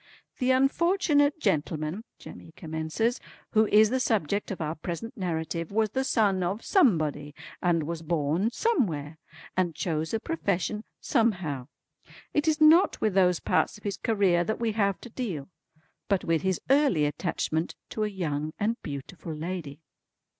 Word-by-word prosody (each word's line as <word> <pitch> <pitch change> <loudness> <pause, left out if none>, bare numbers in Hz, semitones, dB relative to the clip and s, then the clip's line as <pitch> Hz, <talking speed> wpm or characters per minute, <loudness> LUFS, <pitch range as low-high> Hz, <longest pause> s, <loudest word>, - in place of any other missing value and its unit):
"The 255 -1 +1
unfortunate 290 +2 +3
gentleman" 160 - -1
Jemmy 160 - -12
commences, 160 +9 -2 0.3
"who 220 -1 +4
is 215 +1 +5
the 260 - +1
subject 205 -5 0
of 195 - -5
our 155 -1 -2
present 175 - -6
narrative 165 -3 -3
was 215 0 +1
the 265 +2 0
son 205 -7 +2
of 190 +5 -2
Somebody, 155 - +2 0.3
and 170 -3 +2
was 165 +1 -4
born 165 +5 0
Somewhere, 170 - -1 0.4
and 175 -3 0
chose 160 -1 -2
a 225 - 0
profession 210 - -2 0.2
Somehow. 180 - 0 0.7
It 295 +1 +1
is 310 0 +2
not 315 +4 +6
with 215 -3 +1
those 180 -2 +3
parts - - +1
of 210 - -19
his 200 -2 -3
career 195 -6 +2
that 220 +5 -2
we 230 -1 0
have 200 -3 0
to 245 - -9
deal; 195 - -4 0.6
but 195 -3 +1
with 165 -1 +1
his 190 -1 0
early 275 - +4
attachment 160 +1 -2
to 215 - -2
a - - +1
young 155 -6 -3
and 225 +3 -1
beautiful 155 +3 -7
lady." 160 -2 -5
190 Hz, 155 wpm, -27 LUFS, 160-225 Hz, 0.7 s, not